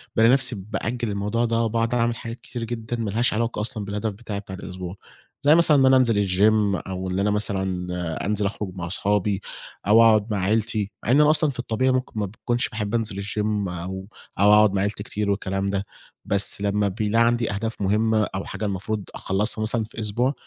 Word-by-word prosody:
بالاقي 115 +2 +5
نفسي 130 -2 +1
بأجل 115 +4 -3
الموضوع 105 +4 0
ده 115 0 +1
وباقعد 115 +1 0
أعمل 120 -1 +1
حاجات 115 0 -8
كتير 120 -2 -6
جدًا 115 0 -4
ما 110 -2 -2
لهاش 115 +5 +2
علاقة 115 0 -1
أصلًا 105 -1 -4
بالهدف 105 +2 -2
بتاعي 100 0 -6
بتاع 95 -2 -8
الأسبوع، 90 -1 -7 0.5
زي 145 +2 +6
مثلًا 165 -3 +5
إن 135 - +5
أنا 130 0 +6
أنزل 115 -6 +3
الgym 100 +1 +3
أو 95 0 -4
اللي 95 +1 -1
أنا 105 - +2
مثلًا 90 -5 -2
أنزل 105 0 0
أخرج 100 -1 -3
مع 90 -2 -4
صحابي 100 +1 0 0.5
أو 115 +2 +7
أقعد 110 -1 +4
مع - - 0
عيلتي، 105 +1 0
مع 115 - +1
إن 140 +4 +6
أنا 150 - +5
أصلًا 155 0 +4
في 130 -2 -6
الطبيعي 125 +2 +1
ممكن 130 -3 -2
ما 105 - 0
باكونش 120 +5 -2
باحب 105 -1 -3
أنزل 105 -4 -2
الgym 105 -1 -1
أو 95 +2 -6 0.3
أو 105 +1 +6
أقعد 105 -1 +6
مع 95 - +1
عيلتي 100 +2 -2
كتير 105 -1 -2
والكلام 95 0 -1
ده، 100 0 -2 0.4
بس 100 0 +1
لمّا 100 0 +1
بيلاقي 105 +4 +1
عندي 120 -1 +1
أهداف 110 +2 -4
مُهمة 110 +2 +2
أو 95 - -3
حاجة 100 +2 -5
المفروض 100 +1 -3
أخلصها 105 +3 -1
مثلًا 110 +1 +1
في 110 - -10
أسبوع، 120 +6 0
105 Hz, 200 wpm, -24 LUFS, 100-115 Hz, 0.5 s, أو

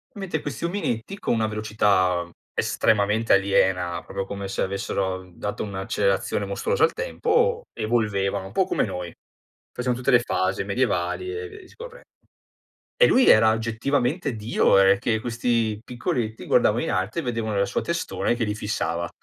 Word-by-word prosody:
mentre 190 -6 -3
questi 145 +3 -4
ominetti 170 - -3
con - - -2
una 110 -2 +1
velocità, 105 -4 +1
mhmm, 85 - -15 0.2
estremamente 110 +1 +1
aliena, 95 -3 +2
proprio 100 0 -5
come 100 0 -5
se - - -3
avessero 95 -1 -2
dato 105 +3 -4
un'accelerazione 100 - -1
mostruosa 470 -1 0
al 455 - +5
tempo, 475 -1 0
evolvevano 100 -4 0
un - - -12
po' - - +2
come - - 0
noi. 90 -1 -4 0.6
Facevano 125 -1 -2
tutte 125 +2 0
le 125 - +7
fasi 95 -5 -1
medievali 100 - -1
e 440 0 -5
via 420 0 -11
discorrendo. 475 +6 -12 0.9
E - - +6
lui 260 - +4
era 110 -1 +7
oggettivamente 125 +6 -1
Dio, 110 0 +2
ehm, 100 0 +5
che 110 +1 0
questi 115 -2 -1
piccoletti 120 -2 -3
guardava - - +3
in - - -2
alto 95 - -1
e - - -6
vedevano 115 -5 -2
la 100 - +2
sua - - -2
testona 170 -6 -1
che 120 - -3
li 105 -1 -2
fissava. 85 -5 -2
110 Hz, 160 wpm, -24 LUFS, 100-140 Hz, 0.9 s, le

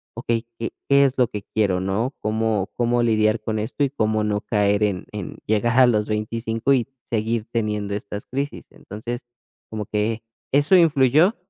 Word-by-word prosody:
"Okey, 115 0 -1
¿qué 115 - -3 0.2
qué 140 0 +6
es 135 0 0
lo 125 -2 +4
que 105 -2 -6
quiero, 100 -4 0
no? 110 +8 -1
¿Cómo 110 -2 0
cómo 120 0 +1
lidiar 110 -2 +2
con 110 0 -2
esto 120 +6 -2
y 140 - +2
cómo 110 -4 0
no 105 0 0
caer 105 -1 +1
en 95 -4 -1
en 105 -3 -6
llegar 115 +4 +2
a 125 - +8
los 105 -3 +1
25 115 +4 -1
y 125 -2 +1 0.2
seguir 115 0 -1
teniendo 105 -3 -1
estas 105 0 -6
crisis?" 140 +2 -4
Entonces, 120 +4 -7 0.4
como 110 -2 -4
que 110 +2 -1 0.3
eso 145 +6 +5
influyó, 155 - +4
110 Hz, 170 wpm, -22 LUFS, 105-120 Hz, 0.4 s, a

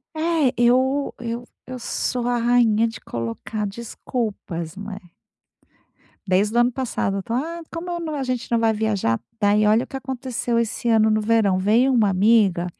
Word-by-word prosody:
É, 315 -4 +1
eu 260 +4 +2
eu 235 0 -4 0.2
eu 255 0 -6
sou 245 0 -2
a 245 0 +1
rainha 230 -2 +3
de 225 - -9
colocar 115 - -4
desculpas, 200 -5 -5
não 205 +2 -8
é. 200 0 -7 1.3
Desde 200 +4 +2
o - - +5
ano 240 +1 +4
passado, 240 -6 -2
eu - - -4
tô 225 - -6
"ah, 325 +8 -2
como 335 +2 -5
eu 345 - -2
não, 315 -2 -4
a 280 - -2
gente 255 -2 -3
não 235 - +3
vai 225 -1 +3
viajar." 205 - 0 0.2
Daí 210 0 +3
olha 220 +3 +4
o - - -15
que - - -7
aconteceu 255 -2 -3
esse 235 +1 -2
ano 220 -1 +4
no 215 0 +2
verão. 210 -3 +2
Veio 225 +8 +3
uma 220 -5 +3
amiga. 195 -2 +3
230 Hz, 185 wpm, -22 LUFS, 210-255 Hz, 1.3 s, o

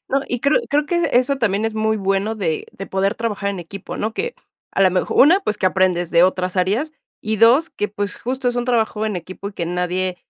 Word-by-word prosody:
No, 275 - +1
y 245 - -2
creo 280 - +3
creo 295 +1 +1
que 345 0 +1
eso 255 +3 +3
también 210 -3 0
es 225 -1 -1
muy 220 0 +1
bueno 195 +2 0
de 170 -8 -2
de 195 - -8
poder 195 +1 0
trabajar 210 -3 -2
en 195 - -5
equipo, 185 +3 -8
¿no? 220 +1 -2
Que 475 - -3 0.4
a - - -1
la 190 - +5
mej 180 0 -1
1, 340 +8 +6
pues, 215 - -2
que - - +1
aprendes 180 -2 +1
de 170 - +5
otras 185 0 +1
áreas 215 +13 0 0.3
y 215 0 -1
2, 250 +10 +5
que, 210 - -3
pues, 205 0 -4
justo 255 +1 -2
es 245 - -2
un 245 - 0
trabajo 225 -3 0
en 210 - -2
equipo 185 +3 -7
y - - -11
que 170 -3 -4
nadie 180 +1 -1
210 Hz, 240 wpm, -20 LUFS, 185-245 Hz, 0.4 s, 1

